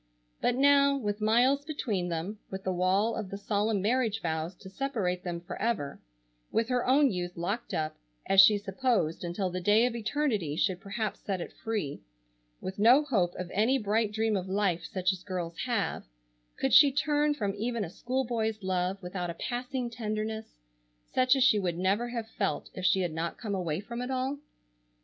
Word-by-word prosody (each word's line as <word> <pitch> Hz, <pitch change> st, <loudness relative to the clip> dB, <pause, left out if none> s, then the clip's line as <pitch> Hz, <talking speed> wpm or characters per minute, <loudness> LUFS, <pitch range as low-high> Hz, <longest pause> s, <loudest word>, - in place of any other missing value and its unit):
But 245 Hz, -, +2 dB
now, 280 Hz, +1 st, +5 dB
with 205 Hz, -4 st, -3 dB
miles 245 Hz, +6 st, +3 dB
between 220 Hz, -, -2 dB
them, 175 Hz, +6 st, -4 dB
with 190 Hz, 0 st, -6 dB
the 185 Hz, -, -1 dB
wall 190 Hz, +5 st, +2 dB
of 195 Hz, -, -4 dB
the 200 Hz, -, -5 dB
solemn 205 Hz, 0 st, 0 dB
marriage 225 Hz, -1 st, +1 dB
vows 160 Hz, 0 st, -3 dB
to 190 Hz, -, -13 dB
separate 195 Hz, -5 st, -2 dB
them 175 Hz, -2 st, -4 dB
forever, 175 Hz, -5 st, -3 dB, 0.5 s
with 225 Hz, +1 st, +1 dB
her 250 Hz, -1 st, +1 dB
own 275 Hz, +1 st, +5 dB
youth 175 Hz, -2 st, -4 dB
locked 200 Hz, +8 st, -3 dB
up 155 Hz, 0 st, -2 dB, 0.3 s
as 195 Hz, 0 st, +7 dB
she 205 Hz, +2 st, +7 dB
supposed 200 Hz, -4 st, 0 dB
until 180 Hz, +2 st, -2 dB
the 185 Hz, +1 st, -3 dB
day 210 Hz, +5 st, +4 dB
of 245 Hz, -1 st, -1 dB
eternity 220 Hz, -, -1 dB
should 180 Hz, +1 st, 0 dB
perhaps 210 Hz, +2 st, -3 dB
set 195 Hz, -2 st, -3 dB
it -, -, -6 dB
free, 210 Hz, -11 st, -3 dB, 0.6 s
with 190 Hz, +2 st, -6 dB
no 245 Hz, +8 st, +6 dB
hope 190 Hz, -11 st, 0 dB
of 180 Hz, -1 st, -6 dB
any 225 Hz, +7 st, +3 dB
bright 215 Hz, -1 st, 0 dB
dream 220 Hz, 0 st, 0 dB
of 185 Hz, -1 st, -3 dB
life 190 Hz, -3 st, +1 dB
such 185 Hz, 0 st, 0 dB
as 185 Hz, -, -8 dB
girls 180 Hz, -3 st, -4 dB
have, 230 Hz, -5 st, -1 dB, 0.5 s
could 270 Hz, -, 0 dB
she 285 Hz, -2 st, +8 dB
turn 295 Hz, +1 st, +1 dB
from 205 Hz, -8 st, -1 dB
even 230 Hz, +1 st, -2 dB
a 170 Hz, -, -5 dB
school 260 Hz, +6 st, -2 dB
boy's 220 Hz, -3 st, -2 dB
love 185 Hz, 0 st, 0 dB
without 180 Hz, 0 st, -4 dB
a 170 Hz, -, -5 dB
passing 250 Hz, +4 st, -3 dB
tenderness, 220 Hz, -1 st, -4 dB, 0.6 s
such 255 Hz, +1 st, +4 dB
as 265 Hz, -, +3 dB
she 235 Hz, -5 st, +5 dB
would 175 Hz, -3 st, -1 dB
never 200 Hz, +6 st, +1 dB
have 230 Hz, -2 st, -4 dB
felt 205 Hz, -2 st, -2 dB
if 185 Hz, -, -7 dB
she 190 Hz, +1 st, +3 dB
had 175 Hz, -3 st, -1 dB
not 165 Hz, +1 st, -3 dB
come 215 Hz, -4 st, -4 dB
away 170 Hz, -4 st, -1 dB
from 235 Hz, +4 st, -6 dB
it 250 Hz, -, -4 dB
all? 265 Hz, +2 st, -1 dB
210 Hz, 190 wpm, -29 LUFS, 185-240 Hz, 0.6 s, she